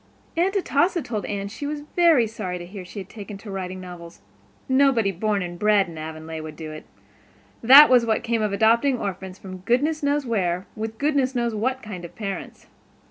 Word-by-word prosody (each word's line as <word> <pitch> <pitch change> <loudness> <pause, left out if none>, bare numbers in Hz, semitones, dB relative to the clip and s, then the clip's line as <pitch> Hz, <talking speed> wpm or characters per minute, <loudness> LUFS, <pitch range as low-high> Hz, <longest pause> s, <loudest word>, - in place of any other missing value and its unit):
Aunt 365 +4 +1
Atossa 355 -1 +1
told 215 -4 -4
Anne 200 -1 -3
she 225 +8 -6
was 295 0 -4
very 330 -9 +5
sorry 210 -5 -5
to 175 - -8
hear 190 +1 -9
she 180 +4 -12
had 190 -2 -6
taken 205 -1 -9
to 200 +1 -10
writing 185 -1 -5
novels; 175 -2 -10 0.5
nobody 260 -6 +3
born 200 +1 -1
and 175 -1 -7
bred 210 -1 +3
in 170 - -10
Avonlea 160 0 -7
would 155 -1 -8
do 155 0 -7
it; 155 - -9 0.8
that 275 +6 +10
was 250 -2 +5
what 225 -1 0
came 230 -1 0
of 210 -1 0
adopting 230 +6 +3
orphans 190 -3 -5
from 185 -1 -9
goodness 285 - +1
knew 285 0 +2
where, 190 -8 -1
with 220 0 -5
goodness 280 -2 +1
knew 235 -2 0
what 255 +5 -1
kind 195 -5 -7
of 170 - -10
parents. 200 -4 -6
215 Hz, 195 wpm, -23 LUFS, 185-255 Hz, 0.8 s, that